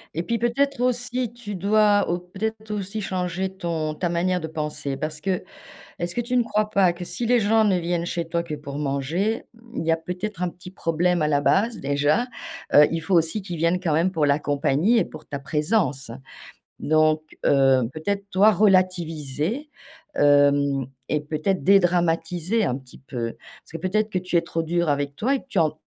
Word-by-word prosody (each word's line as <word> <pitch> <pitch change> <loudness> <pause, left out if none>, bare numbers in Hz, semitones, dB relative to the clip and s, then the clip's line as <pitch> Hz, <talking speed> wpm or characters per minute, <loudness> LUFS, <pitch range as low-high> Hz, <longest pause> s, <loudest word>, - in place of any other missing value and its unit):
Et 165 - 0
puis 230 +6 -1
peut-être 270 +4 0
aussi, 245 -1 -1
tu 230 -4 -7
dois 205 +2 +3
ou 175 - -1
peut-être 215 +5 -5
aussi 205 +1 -3
changer 185 -1 -2
ton 160 -4 -2
ta 175 +2 -1
manière 180 +2 0
de 160 - -4
penser. 150 -3 -4
Parce 155 +2 -4
que 190 -2 -1 0.6
est-ce 175 0 -3
que 240 - +1
tu 245 +2 -2
ne 250 - +5
crois 215 -1 -1
pas 190 -4 +3
que 175 +1 -7
si 235 +6 -3
les 245 0 +4
gens 220 +1 +3
ne 200 -4 +3
viennent 175 0 -1
chez 170 -2 -3
toi 170 +1 -1
que 170 -3 -5
pour 145 -1 -7
manger, 160 - -1
mmh, 230 +1 -9
il 160 - -4
y 165 - +2
a 165 - +3
peut-être 180 +4 -5
un 180 - +1
petit 180 +1 -12
problème 175 -1 0
à 150 - +2
la 145 -1 +2
base? 225 +8 +2
Déjà, 145 - +1 0.5
heu, 150 0 +8
il 165 - -2
faut 170 +4 -2
aussi 165 +5 +1
qu'ils 175 -3 -5
viennent 170 +3 +1
quand 170 -4 0
même 170 +5 +2
pour 160 -5 +1
la 145 +1 +2
compagnie 145 - +2
et 205 - +3
pour 155 - -12
ta 140 - -4
présence. 150 - -1 0.7
Donc, 155 0 +2 0.2
heu, 135 -2 +4
peut-être 200 +6 -3
toi, 205 +3 +5
relativiser. 185 - +1 0.5
Hem 145 -2 +3 0.2
et 150 - 0
peut-être 155 +6 -2
dédramatiser 175 +1 +2
un 125 - 0
petit 130 -2 -16
peu. 120 -4 -5 0.3
Parce - - -18
que 165 - -5
peut-être 210 +5 0
que 185 - 0
tu 180 -1 -2
es - - +5
trop 165 - -3
dure 170 0 0
avec 145 0 0
toi 260 +6 +1
et 270 - -1
que - - -21
tu 215 - -2
en 155 -3 +3
175 Hz, 200 wpm, -24 LUFS, 155-205 Hz, 0.7 s, heu